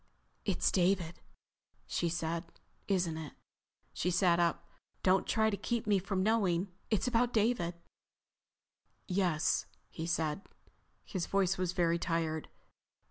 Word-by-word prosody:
"It's -, -, +2 dB
David," 180 Hz, -2 st, +1 dB, 0.7 s
she 170 Hz, -, -1 dB
said. 165 Hz, +1 st, -2 dB, 0.4 s
"Isn't 175 Hz, -5 st, +1 dB
it?" 155 Hz, -2 st, -7 dB, 0.6 s
She 180 Hz, -, 0 dB
sat 175 Hz, -1 st, +3 dB
up. 170 Hz, -1 st, +1 dB, 0.4 s
"Don't 190 Hz, +1 st, +3 dB
try 220 Hz, -1 st, +3 dB
to -, -, 0 dB
keep 235 Hz, +3 st, -2 dB
me 205 Hz, -2 st, +3 dB
from 185 Hz, 0 st, -1 dB
knowing. 195 Hz, -4 st, +2 dB, 0.2 s
It's 215 Hz, +2 st, +1 dB
about 245 Hz, 0 st, +2 dB
David." 210 Hz, -6 st, +1 dB, 1.3 s
"Yes," 180 Hz, -4 st, +1 dB, 0.2 s
he 160 Hz, 0 st, -5 dB
said. 160 Hz, 0 st, 0 dB, 0.6 s
His 185 Hz, -5 st, -3 dB
voice 195 Hz, -1 st, +2 dB
was 180 Hz, -1 st, 0 dB
very 170 Hz, -2 st, +2 dB
tired. 165 Hz, -2 st, -1 dB
180 Hz, 125 wpm, -33 LUFS, 170-200 Hz, 1.3 s, sat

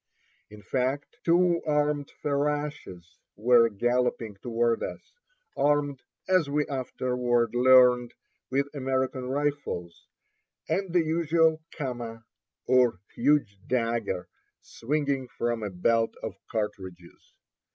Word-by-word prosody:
In 105 Hz, -1 st, -13 dB
fact, 130 Hz, +6 st, -2 dB
two 175 Hz, 0 st, +3 dB
armed 150 Hz, -1 st, +1 dB
ferashes 145 Hz, -9 st, -2 dB, 0.3 s
were 115 Hz, +1 st, +5 dB
galloping 120 Hz, 0 st, 0 dB
toward 115 Hz, +1 st, 0 dB
us, -, -, -7 dB, 0.4 s
armed, 145 Hz, -2 st, +1 dB, 0.3 s
as 185 Hz, -6 st, +3 dB
we 150 Hz, +1 st, +1 dB
afterward 125 Hz, -3 st, -1 dB
learned, 125 Hz, -1 st, +5 dB, 0.3 s
with 140 Hz, +2 st, +1 dB
American 130 Hz, -2 st, -1 dB
rifles, 140 Hz, -11 st, -3 dB, 0.6 s
and 195 Hz, -2 st, -1 dB
the 175 Hz, -1 st, +3 dB
usual 160 Hz, 0 st, +2 dB
kamma, 120 Hz, -5 st, -6 dB, 0.4 s
or 125 Hz, -6 st, +3 dB
huge 140 Hz, -10 st, +1 dB
dagger, 115 Hz, -7 st, -1 dB, 0.3 s
swinging 140 Hz, 0 st, -2 dB
from 120 Hz, -1 st, -2 dB
a 105 Hz, -, -3 dB
belt 115 Hz, +5 st, +1 dB
of -, -, -4 dB, 0.2 s
cartridges. 95 Hz, -5 st, -6 dB
130 Hz, 100 wpm, -27 LUFS, 115-145 Hz, 0.6 s, were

